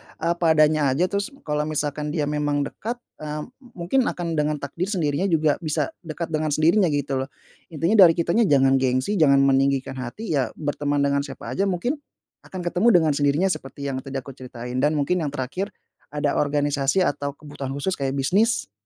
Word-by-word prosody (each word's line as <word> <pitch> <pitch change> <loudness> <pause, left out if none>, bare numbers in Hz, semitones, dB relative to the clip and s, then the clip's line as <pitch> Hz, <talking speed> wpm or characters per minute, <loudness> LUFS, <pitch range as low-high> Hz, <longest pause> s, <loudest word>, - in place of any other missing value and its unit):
apa 170 -1 +1
adanya 155 -1 +4
aja, 180 +5 +1
terus 200 0 -1 0.2
kalau 150 0 -1
misalkan 150 0 -2
dia 150 - 0
memang 145 0 0
dekat, 225 +11 -5 0.2
eee, 150 0 -4 0.2
mu 240 -10 -11
mungkin 250 +8 +2
akan 175 -1 -3
dengan 150 -1 0
takdir 150 +6 -4
sendirinya 170 -3 0
juga 155 -4 +2
bisa 155 - -1 0.2
dekat 165 +1 -5
dengan 155 -2 0
sendirinya, 170 +5 +4
gitu, 145 -3 -1
loh. 130 - -3 0.4
Intinya 170 +7 +1
dari 165 - +2
kitanya 180 +6 +2
jangan 135 -1 +4
gengsi, 130 +9 0
jangan 140 -3 +5
meninggikan 135 -1 +1
hati, 165 - -6
ya, 130 - -2
berteman 145 -1 -1
dengan 140 0 +2
siapa 140 -2 -6
aja, 195 +1 0
mungkin 240 - -1 0.5
akan 185 -1 -6
ketemu 180 +6 +1
dengan 160 -3 +4
sendirinya, 145 +6 +2
seperti 140 -2 -5
yang 130 - -3
tadi 135 +1 -9
aku 135 0 -5
ceritain, 125 -1 -6
dan 150 +3 +2
mungkin 150 +5 +1
yang 155 - -1
terakhir, 140 +10 -3 0.5
ada 145 -1 0
organisasi 145 +3 +1
atau 140 -3 -2
kebutuhan 140 -3 -7
khusus 145 +7 -1
kayak 135 0 -1
bisnis, 185 - +1
150 Hz, 180 wpm, -23 LUFS, 140-170 Hz, 0.5 s, jangan